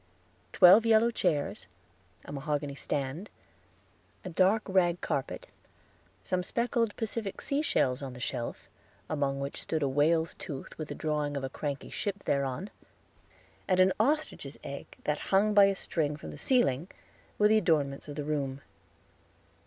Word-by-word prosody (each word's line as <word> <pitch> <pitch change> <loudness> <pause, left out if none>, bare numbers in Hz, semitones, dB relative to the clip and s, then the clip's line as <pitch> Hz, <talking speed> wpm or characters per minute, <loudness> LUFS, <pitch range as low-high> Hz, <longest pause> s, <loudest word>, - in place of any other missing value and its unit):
Twelve 190 +5 +8
yellow 225 +1 +4
chairs, 150 - -1 0.6
a - - -8
mahogany 145 0 -2
stand, 145 +7 -3 1.0
a 185 - -5
dark 190 +6 +3
rag 180 -3 +2
carpet, 135 - -3 0.8
some 185 -1 0
speckled 235 +2 0
Pacific 220 -2 -4
sea 280 +1 -1
shells 130 - +1
on 135 -2 -6
the 125 - -10
shelf, 120 -2 -4 0.4
among 140 -2 0
which 140 0 -4
stood 160 -2 -1
a - - +2
whale's 160 +4 +2
tooth 140 -3 -8
with 155 - -5
a - - -5
drawing 150 -2 -1
of 135 - -4
a 135 - -4
cranky 145 -1 -4
ship 200 -1 -3
thereon, 140 +7 -1 1.0
and 185 -1 +2
an 185 0 +5
ostrich's 255 - 0
egg 140 - -7 0.2
that 150 0 0
hung 205 +2 +4
by 205 -1 +8
a 195 0 +2
string 150 -6 -1
from - - -8
the - - -9
ceiling, 175 - +2 0.5
were 210 - +5
the 215 +1 +5
adornments 150 -8 0
of 145 - -7
the 150 - -3
room. 140 -2 -2
155 Hz, 155 wpm, -30 LUFS, 140-200 Hz, 1.0 s, Twelve